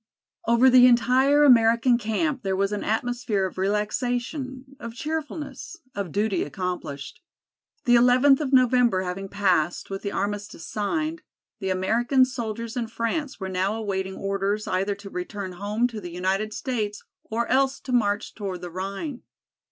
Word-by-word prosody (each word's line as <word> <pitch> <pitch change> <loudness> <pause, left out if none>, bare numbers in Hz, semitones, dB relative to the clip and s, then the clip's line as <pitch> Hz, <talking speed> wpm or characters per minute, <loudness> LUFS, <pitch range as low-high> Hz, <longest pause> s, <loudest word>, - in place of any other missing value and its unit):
Over 235 +3 +5
the 250 -1 +8
entire 255 +4 +4
American 235 -2 +5
camp 260 +5 -1
there 195 -3 -1
was 195 +1 0
an 210 - -2
atmosphere 225 -2 -1
of 185 - -6
relaxation, 245 +6 -2
of 230 0 -7
cheerfulness, 310 +3 -5 0.2
of 200 -5 -4
duty 205 +2 0
accomplished. 145 - -5 0.6
The 240 - +4
eleventh 255 +4 +5
of 280 -3 -2
November 250 -6 +4
having 190 +2 -5
passed, 185 -4 0
with 195 - -4
the 200 - -3
armistice 205 -4 -4
signed, 310 - -2 0.4
the 190 -3 -3
American 235 +8 +3
soldiers 230 -2 -5
in 240 -2 -2
France 240 +5 -3
were 190 - -4
now 190 +3 0
awaiting 190 -3 -3
orders 200 +2 -1
either 195 +2 0
to 200 0 -10
return 185 +1 -5
home 205 +6 -1
to 220 -3 -7
the 175 - -7
United 190 +5 -1
States 215 -4 -3 0.2
or 230 +2 -2
else 270 +1 +2
to 260 - -7
march 205 -4 +1
toward 195 -4 -5
the 175 - -7
Rhine. 195 - -5
220 Hz, 150 wpm, -25 LUFS, 195-250 Hz, 0.6 s, the